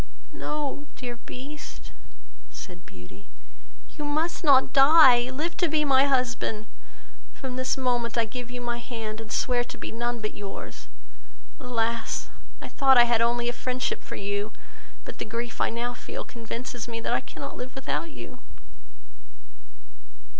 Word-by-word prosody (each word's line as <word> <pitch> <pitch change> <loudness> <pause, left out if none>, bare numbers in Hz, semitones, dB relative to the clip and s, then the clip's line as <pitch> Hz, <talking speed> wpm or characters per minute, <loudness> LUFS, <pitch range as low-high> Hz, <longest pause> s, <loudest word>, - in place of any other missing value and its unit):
"No, 295 -1 -3
dear 245 -2 -5
Beast, 280 +5 -9 0.6
(said 180 -3 -10
Beauty,) 95 +2 -13 0.7
you 300 - -3
must 310 +5 0
not 275 -4 +6
die; 270 -4 +8
live 310 +6 -2
to 350 - +3
be 305 -1 +2
my 270 -1 +6
husband; 245 -5 +1 0.7
from 260 -2 -5
this 255 +1 0
moment 245 -3 0
I 230 - +4
give 245 +2 -6
you 245 0 -6
my 240 0 -2
hand, 225 -3 -5
and 220 - -9
swear 245 -1 +2
to - - -9
be - - -5
none 240 +1 -2
but 215 -1 -3
yours. 200 -1 -7 0.7
Alas! 230 -2 -1 0.3
I - - -5
thought 270 -2 +5
I 240 - +10
had 235 -1 +3
only 240 +1 +2
a 240 - +1
friendship 255 +1 -2
for - - -7
you, 200 +1 -2 0.5
but, - - -8
the - - -1
grief 230 +1 -4
I - - +3
now 240 +1 -2
feel - - -6
convinces 235 +1 -6
me, 230 -1 -4
that - - 0
I - - +2
cannot - - -7
live 250 +1 -6
without 270 +5 -2
you." 300 - -9
245 Hz, 155 wpm, -27 LUFS, 230-265 Hz, 0.7 s, I